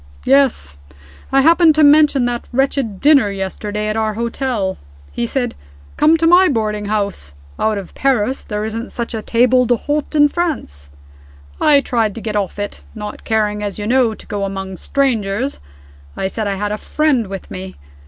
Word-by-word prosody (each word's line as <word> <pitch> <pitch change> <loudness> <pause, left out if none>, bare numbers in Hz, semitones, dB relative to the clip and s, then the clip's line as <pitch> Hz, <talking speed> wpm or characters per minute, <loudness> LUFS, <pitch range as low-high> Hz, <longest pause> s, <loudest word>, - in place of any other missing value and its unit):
"Yes. 255 - +2 0.5
I 270 - +4
happened 330 +1 +5
to 310 - +4
mention 290 -3 +5
that 240 -1 -3
wretched 260 -5 -1
dinner 280 -7 +5
yesterday 205 +2 -4
at 215 - -1
our 220 -1 -1
hotel. 235 -4 -2 0.3
He 235 - -2
said, 245 -1 -2 0.4
'Come 310 +2 +4
to 330 - 0
my 355 +3 +6
boarding 215 -6 -1
house. 200 - -3 0.2
Out 220 -1 +1
of 195 -3 -8
Paris, 265 -1 0
there 210 0 -4
isn't 225 +2 -5
such 235 -1 -5
a 220 - -3
table 250 +2 +3
d'hote 290 +6 -1
in 295 -1 +6
France.' 285 - -3 0.7
I 290 -2 +5
tried 225 -6 -1
to 230 - -7
get 215 -1 -4
off 200 -2 -2
it 205 0 -5
not 210 -1 -7
caring, 210 -1 0
as 205 -2 -4
you 205 - -4
know, 240 -1 +2
to - - -14
go 205 -2 -4
among 195 -1 -5
strangers 245 - -1 0.6
I - - -1
said 215 +1 -3
I 200 - -1
had 205 +1 -3
a 210 - -3
friend 290 -8 0
with 195 0 -8
me. 185 0 -7
225 Hz, 175 wpm, -17 LUFS, 205-270 Hz, 0.7 s, my